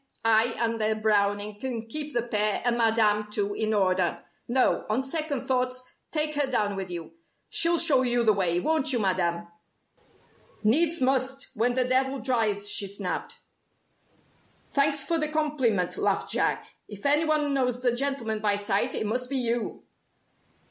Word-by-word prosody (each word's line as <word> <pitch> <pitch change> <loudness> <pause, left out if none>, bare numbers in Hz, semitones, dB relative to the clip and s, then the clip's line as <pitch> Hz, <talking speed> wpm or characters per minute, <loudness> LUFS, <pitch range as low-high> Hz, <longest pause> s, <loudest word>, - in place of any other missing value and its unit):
"I 225 +1 +3
and 230 -1 -1
a 215 0 +1
Browning 205 -1 0
can 235 -2 -5
keep 295 +5 -1
the 240 - +1
pair 210 -3 0
and 240 -1 +2
Madame, 220 -2 +2
too, 205 -1 -1
in 220 +1 -1
order. 185 -4 0 0.2
No, 255 +1 +1
on 230 +5 0
second 290 -1 -3
thoughts 255 0 -1 0.2
take 305 -1 +1
her 285 -2 0
down 210 -5 0
with 190 -1 -5
you. 170 -2 -7 0.4
She'll 340 0 +3
show 305 -6 +5
you 245 -1 +1
the 220 -2 +4
way, 180 -3 +1
won't 310 - +1
you, 250 - +1
Madame?" 175 -4 -1 1.2
"Needs 320 +9 +4
must, 265 +1 0
when 245 +3 0
the 255 -1 +2
Devil 265 +1 +1
drives," 220 -6 0
she 205 -1 +2
snapped. 195 -2 -5 1.3
"Thanks 285 0 +2
for 330 +2 -1
the 305 - +1
compliment," 280 - -1
laughed - - 0
Jack. - - -1
"If 205 +2 -11
any 295 +3 +3
one 300 -2 +1
knows 250 -2 0
the 245 -1 +2
gentleman 245 -5 -2
by 210 -1 +1
sight, 205 -1 0
it - - -2
must 250 +4 -3
be 275 - 0
you!" 240 -2 -1
240 Hz, 160 wpm, -26 LUFS, 210-270 Hz, 1.3 s, show